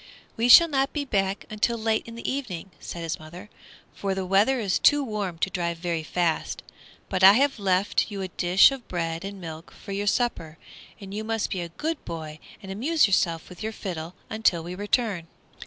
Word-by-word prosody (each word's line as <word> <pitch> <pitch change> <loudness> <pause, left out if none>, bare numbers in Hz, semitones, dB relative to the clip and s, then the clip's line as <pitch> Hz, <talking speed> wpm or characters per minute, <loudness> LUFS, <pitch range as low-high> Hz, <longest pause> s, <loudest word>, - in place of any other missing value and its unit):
"We 235 +2 +1
shall 335 +7 +10
not 275 -3 0
be 295 -2 -2
back 195 -5 -1 0.2
till 235 +2 +2
late 220 0 0
in 230 - -9
the 235 - -6
evening," 205 -10 -4
said 170 - -7
his 165 - -3
mother, 175 +7 -11 0.4
"for 195 -1 -2
the 190 -1 -3
weather 205 +8 +3
is 200 -5 0
too 290 -1 +5
warm 205 -8 -3
to 190 - 0
drive 170 -2 -2
very 170 -1 -2
fast. 165 +1 -1 0.4
But 185 -1 -1
I 195 +1 +10
have 270 +1 +2
left 195 +1 +1
you 200 -2 -5
a - - -3
dish 180 +6 +5
of 270 -3 -7
bread 165 -1 -3
and 195 0 -7
milk 165 -1 -8
for 200 - -11
your 200 +1 -2
supper, 185 -9 -1 0.4
and 195 -2 -9
you 215 +1 -3
must 225 -1 -2
be 185 - -2
a 170 - -5
good 310 - -4
boy 155 -2 -7 0.2
and 190 - -7
amuse 290 +11 +2
yourself 170 -5 +1
with 180 - -12
your 220 0 -3
fiddle 175 -5 -6
until 220 -7 +1
we 175 +2 -6
return." 205 -2 -1
195 Hz, 205 wpm, -25 LUFS, 175-225 Hz, 0.4 s, shall